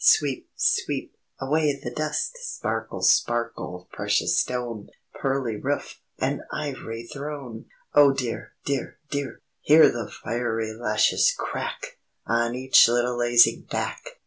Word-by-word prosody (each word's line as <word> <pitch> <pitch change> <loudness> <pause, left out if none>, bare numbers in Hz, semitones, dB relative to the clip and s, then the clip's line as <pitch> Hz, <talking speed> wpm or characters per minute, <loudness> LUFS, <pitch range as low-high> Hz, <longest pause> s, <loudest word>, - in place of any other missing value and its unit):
Sweep! 140 -3 +3
Sweep! - - 0 0.2
Away 145 +1 +1
the 120 - -6
dust! 155 - -2
Sparkle! - - -4
Sparkle! 115 -6 +1
Precious - - +1
stone, 120 -4 -4 0.3
Pearly 135 -5 -1
roof, 140 +6 -3 0.2
And - - -1
ivory 120 -6 -5
throne!_ 140 -4 -7 0.3
"_Oh, 140 -2 +6
dear! 125 -4 -4
dear! 140 -2 -2
dear! 140 -2 -4 0.2
Hear 155 +2 +7
the 115 -3 -4
fiery 115 -1 -3
lashes 110 -1 +2
crack! - - -5 0.3
On 115 +1 +1
each 130 -1 +6
little 120 +1 +1
lazy 120 0 +5
back! - - -3
125 Hz, 120 wpm, -25 LUFS, 115-140 Hz, 0.3 s, Hear